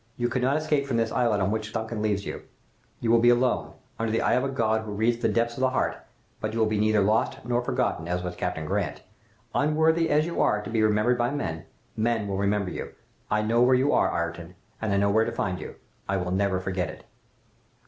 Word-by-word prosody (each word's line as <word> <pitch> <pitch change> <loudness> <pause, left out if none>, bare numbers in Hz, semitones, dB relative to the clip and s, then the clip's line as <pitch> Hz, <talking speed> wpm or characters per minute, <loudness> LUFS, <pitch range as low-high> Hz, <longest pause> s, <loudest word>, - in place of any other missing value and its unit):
You 120 0 0
cannot 130 +3 +1
escape 150 -2 0
from 125 -4 0
this 115 -1 0
islet 115 -4 +1
on 95 +1 +1
which 110 -1 -2
the 105 - -12
'Duncan' 110 -1 -4
leaves 105 -2 0
you. - - -5 0.6
You 115 - +1
will 115 - +6
be 120 +1 +5
alone, 125 +1 +2 0.3
under 115 -1 -1
the 115 - +1
eye - - +2
of 125 +2 +2
a 135 - -1
God 110 -4 +1
who 110 -1 -6
reads 115 +3 +1
the - - +1
depths 120 0 +1
of - - -5
the 130 0 +3
heart, - - 0 0.4
but 110 0 -3
you 115 - -2
will 110 - +4
be 110 -1 0
neither 110 0 +3
lost 105 +3 +1
nor 120 0 +1
forgotten, 80 - -1
as 90 +1 -2
was 90 -1 -4
Captain 85 -3 -3
Grant. 90 -4 -2 0.5
Unworthy 160 +3 +2
as 150 +1 +3
you 170 - -2
are 105 - +3
to 105 - -7
be 110 -1 +1
remembered 110 +3 +2
by 120 0 +2
men, 80 - -4 0.3
men 110 -1 0
will 100 -1 -2
remember 100 -1 0
you. - - -6 0.4
I 105 0 +1
know 115 +2 +2
where 125 +1 +5
you 135 +3 +2
are 95 - +3
Ayrton, 85 +1 -4 0.3
and 110 -2 -1
I 100 - +2
know 100 0 +2
where 110 +2 +4
to - - -2
find 90 -2 -2
you. - - -8 0.3
I 100 - +1
will 90 -1 -2
never 95 0 +1
forget 95 -2 -2
it! - - -10
110 Hz, 240 wpm, -26 LUFS, 100-120 Hz, 0.6 s, will